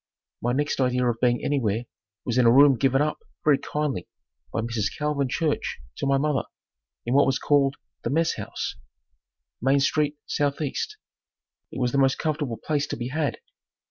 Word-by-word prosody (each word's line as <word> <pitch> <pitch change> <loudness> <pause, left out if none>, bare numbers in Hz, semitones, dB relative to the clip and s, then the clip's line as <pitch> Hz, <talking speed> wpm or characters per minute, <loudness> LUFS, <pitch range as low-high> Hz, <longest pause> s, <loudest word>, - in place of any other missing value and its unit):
My 120 - 0
next 145 +2 0
idea 125 -1 +2
of 115 -1 0
being 120 -1 +2
anywhere 115 -6 0 0.4
was 125 0 +1
in 120 - +5
a - - +7
room 140 +2 +7
given 135 +3 +2
up, 150 - -2 0.3
very 145 -2 +5
kindly, 150 - -2 0.4
by - - -1
Mrs. 115 -2 -2
Calvin 150 -3 0
Church 155 +2 -1 0.2
to 140 - -2
my 135 0 +3
mother, 145 -1 +1 0.6
in 120 - 0
what 140 0 +5
was 135 - +2
called 140 -1 +2 0.3
the - - -2
"messhouse," 165 +3 -1 0.8
Main 135 +3 +3
St. 150 +1 +1
S. - - -3 0.2
E. 145 -4 -1 1.0
It - - -6
was 125 -1 +1
the 140 - +1
most 135 -1 +3
comfortable 150 -7 -2
place 145 +5 -1
to - - -4
be 120 +1 -4
had. 155 +3 -1
135 Hz, 175 wpm, -25 LUFS, 125-145 Hz, 1.0 s, a